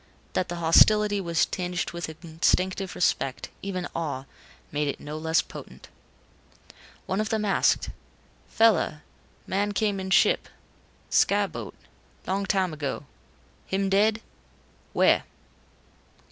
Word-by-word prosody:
That 185 - 0
the 175 - -3
hostility 205 +5 +5
was 170 -2 +2
tinged 180 -1 -3
with 170 -2 -5
instinctive 180 +4 -1
respect, 135 -6 0
even 185 -3 -3
awe, 145 -5 -3 0.5
made 150 0 0
it 140 - -3
no 150 +1 -7
less 160 +1 +1
potent. - - -11 1.2
One 190 +2 -1
of 215 - -2
them 215 -1 0
asked, 200 - +2 0.6
"Fella 210 -8 +3 0.4
man 205 +2 -1
came 205 -1 0
in 190 0 -4
ship - - +4 0.6
sky - - +4
boat - - -7 0.5
long 195 +1 -1
time 185 -4 +1
ago. 145 -1 -4 0.6
Him 195 0 0
dead? 210 +3 +3 0.7
Where?" - - +4
185 Hz, 120 wpm, -26 LUFS, 160-200 Hz, 1.2 s, hostility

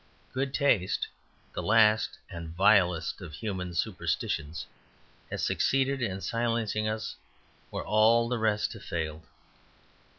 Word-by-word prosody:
Good 135 +1 -1
taste, 125 -10 +2 0.5
the - - -3
last 110 0 +4
and 85 -2 -7
vilest 90 -3 +3
of 85 -5 -8
human 90 -1 -4
superstitions, 80 -1 -2 0.6
has - - -3
succeeded 135 0 +1
in 95 -5 -2
silencing 115 -2 0
us 110 0 -3 0.5
where - - -4
all 115 +2 +4
the 120 -1 -1
rest 105 -1 +1
have - - -11
failed. 80 -1 -4
110 Hz, 120 wpm, -29 LUFS, 90-115 Hz, 0.6 s, last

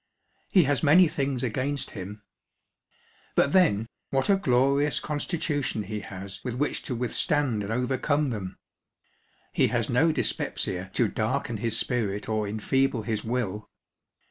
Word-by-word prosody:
He 185 - +5
has 145 -1 +1
many 165 +4 +6
things 135 -4 -2
against 130 +4 -2
him. 100 +3 -8 1.1
But 140 - +3
then, 135 - +4 0.2
what 135 +7 +2
a - - +6
glorious 140 -3 +2
constitution 145 - -2
he 105 +1 -4
has 95 -2 -8
with 125 -2 -3
which 145 +4 -1
to 125 - -3
withstand 125 0 0
and 100 +1 -4
overcome 130 +4 0
them! 95 -4 -5 1.0
He - - +3
has - - -1
no 160 +7 +4
dyspepsia 95 -9 -2
to 120 - +3
darken 110 +2 -2
his 115 +1 0
spirit 105 -5 -1
or 110 -1 -1
enfeeble 115 +3 0
his 105 0 -2
will. 110 -4 -3
125 Hz, 140 wpm, -27 LUFS, 105-145 Hz, 1.1 s, many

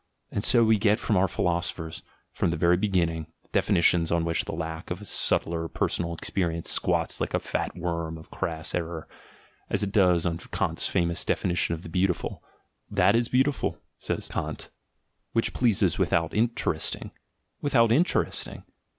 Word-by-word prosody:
And 100 - -2
so 120 0 +5
we 110 -1 +4
get 105 +1 +3
from 110 - 0
our 95 +1 +4
philosophers, 85 -3 -2 0.3
from - - 0
the 85 - -1
very 85 +2 +4
beginning, 85 -5 0 0.2
definitions 85 -3 +3
on 85 -1 +1
which 85 0 0
the - - -4
lack 80 0 -5
of 90 - -3
a 105 - -10
subtler 85 -3 +2
personal 85 +1 -1
experience 85 -1 -1
squats - - +1
like - - -1
a - - +2
fat - - -3
worm 85 -2 -3
of 80 - -14
crass 80 -1 -4
error, 85 -2 -3 0.6
as - - +1
it 100 - -2
does 90 -5 +4
on 85 -1 -1
Kant's - - -1
famous 85 -1 0
definition 85 -2 0
of 80 - -11
the - - -8
beautiful. 90 +1 -1 0.5
"That 100 +1 +3
is 120 0 +1
beautiful," 135 +3 +1 0.2
says - - -3
Kant, - - -5 0.6
"which 115 - +1
pleases 115 -6 +2
without 80 -1 +1
interesting." 115 +2 -1 0.5
Without 115 -6 +3
interesting! 160 +10 0
85 Hz, 160 wpm, -27 LUFS, 85-105 Hz, 0.6 s, so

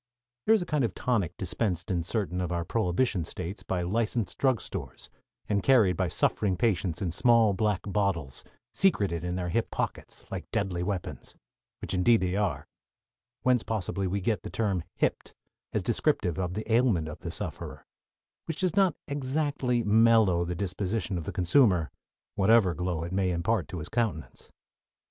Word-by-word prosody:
There 220 - +7
is 205 - +1
a - - -8
kind 150 -4 0
of 110 -6 -1
tonic 100 -9 -1
dispensed 90 -2 -2
in 90 -2 +1
certain 90 0 -2
of 90 -1 -2
our 85 -1 -1
prohibition 105 -1 0
States 90 +4 -6
by 90 -2 -2
licensed 110 +3 -1
drugstores 130 -4 -2 0.4
and 100 -1 +1
carried 110 -7 +4
by - - 0
suffering 95 -4 0
patients 95 -5 0
in 90 - -1
small 115 +2 +4
black 105 0 0
bottles, 95 -9 -1 0.3
secreted 100 - +2
in 90 0 -2
their 90 -1 -2
hip - - 0
pockets, - - -4
like - - -5
deadly 95 -4 -1
weapons 95 -1 -4 0.5
which - - -4
indeed 110 +5 +4
they 90 0 0
are 100 -2 -1 0.8
(whence, 125 -2 +3
possibly, 100 -3 -2
we 100 +2 -1
get 100 -1 0
the - - -7
term 100 -6 -1
"hipped" - - -1 0.4
as - - -1
descriptive 90 -1 0
of 90 -1 -2
the 110 - -3
ailment 115 -10 +3
of 75 - -7
the - - -6
sufferer) - - -6 0.6
which 165 +2 -4
does 185 -3 +1
not 190 -6 +4
exactly 140 -3 0
mellow 110 -4 +4
the 90 +1 -3
disposition 95 +1 -2
of 80 - -7
the - - -3
consumer, 90 - +3 0.4
whatever 100 -2 +4
glow 85 0 -2
it 85 - -5
may 95 -1 +1
impart 90 +3 0
to 90 - -6
his 75 - -5
countenance. 110 -10 -3
100 Hz, 165 wpm, -28 LUFS, 90-115 Hz, 0.8 s, There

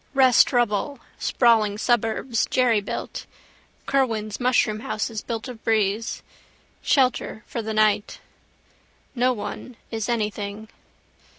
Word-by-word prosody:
Rest 260 -3 +5
rubble, 240 +2 0 0.2
sprawling 220 -4 +3
suburbs, 230 +1 0
jerrybuilt. 230 -5 0 0.6
Kerwan's 225 -6 0
mushroom 245 -4 +2
houses 220 -3 -3
built 230 +1 -5
of 245 -3 -10
breeze. 220 0 0 0.6
Shelter, 255 -5 +1
for 235 - -4
the 220 0 -4
night. 215 -1 +2 0.9
No 250 0 +2
one 225 +2 -6
is 225 0 -3
anything. 210 -1 -3
225 Hz, 100 wpm, -24 LUFS, 215-245 Hz, 0.9 s, Rest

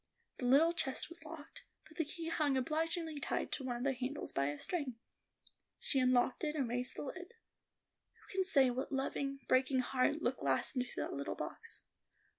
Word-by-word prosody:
The 245 - 0
little 310 +7 +6
chest 265 -5 -1
was 340 -1 -9
locked, 310 -1 -9 0.2
but 315 - -17
the 325 - +1
key 330 +2 -4
hung 295 -4 +2
obligingly 320 +3 -1
tied - - -2
to 275 - -3
one 250 -2 -2
of 240 - -4
the 275 0 +2
handles 260 +3 -3
by 140 0 +1
a 145 0 -2
string. 285 - -2 0.8
She 270 - +2
unlocked 255 +1 +3
it, 305 0 0
and 275 -5 0
raised 245 +2 -1
the - - -4
lid. 365 - -7 0.8
Who - - -22
can 380 0 +1
say 275 -9 +5
what 255 +4 -3
loving, 275 0 -2
breaking 260 0 +3
heart 265 +5 +1
looked 250 0 0
last 135 - +2
into 250 -1 0
that - - -2
little - - -3
box? 460 - -7
275 Hz, 190 wpm, -36 LUFS, 255-320 Hz, 0.8 s, little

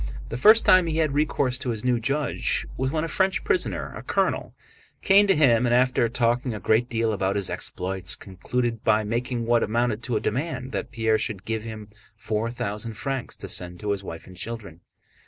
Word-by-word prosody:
The - - -4
first 215 - +6
time 185 -2 +6
he 160 -1 -1
had 155 -3 +1
recourse 140 -3 +1
to 130 - -3
his 115 0 -3
new 125 -2 +2
judge 140 +6 0
was 130 +1 -1
when 155 +2 -1
a - - -1
French 190 +3 0
prisoner, 390 -5 -1
a - - -7
colonel, - - -1 0.5
came 200 +1 +6
to 195 - +4
him 125 -5 +4
and, 120 - +3
after 125 -2 +3
talking 120 0 0
a - - -5
great 110 +6 +2
deal 115 -1 0
about 95 -1 0
his 100 -3 0
exploits, 95 +1 -2
concluded 115 +5 -3
by 110 0 +3
making 120 +2 -2
what 120 0 +3
amounted 115 0 0
to 120 -3 -1
a - - 0
demand 130 0 -3
that - - -3
Pierre 110 -3 +1
should 100 -3 -4
give 110 -1 -2
him 110 -1 -8 0.3
four 110 +1 -2
thousand 110 -1 -4
francs 135 +3 -3
to - - -8
send 90 -1 -4
to 105 -1 -1
his 100 -1 -2
wife 80 -3 -8
and 95 - -13
children. 105 -8 -7
115 Hz, 205 wpm, -25 LUFS, 105-130 Hz, 0.5 s, first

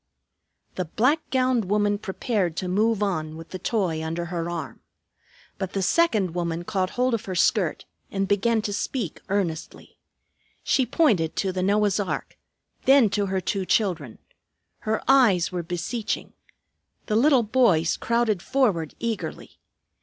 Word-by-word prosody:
The 185 - -1
black 255 - +2
gowned 255 -4 +1
woman 205 +1 +1
prepared 190 -4 -2
to 185 - -2
move 210 +3 +1
on 160 -5 -2
with 165 0 -10
the 185 - -6
toy 180 -9 -1
under 165 +2 -3
her 170 -1 -2
arm. 165 -5 -5 0.8
But 190 -2 -4
the 195 - -1
second 210 - +2
woman 170 -1 -2
caught 185 0 -1
hold 250 0 +2
of 230 - -2
her 185 - -4
skirt 180 -1 +1 0.2
and 195 0 -1
began 215 +3 +2
to 205 - -2
speak 205 - -3
earnestly. 185 -5 -3 0.6
She 260 -2 +2
pointed 215 - +2
to 195 - 0
the 185 0 -3
Noah's 205 +1 +2
ark, 200 - -3 0.5
then 265 -6 +6
to 205 -1 0
her 190 0 0
two 195 +2 -1
children. 175 - 0 0.6
Her 220 0 -2
eyes 230 -11 +4
were 180 -1 -2
beseeching. 175 +7 -4 0.7
The 215 - -1
little 260 +1 +5
boys 210 -9 +3
crowded 230 -5 0
forward 205 - 0
eagerly. 230 -2 -5
200 Hz, 145 wpm, -25 LUFS, 175-230 Hz, 0.8 s, then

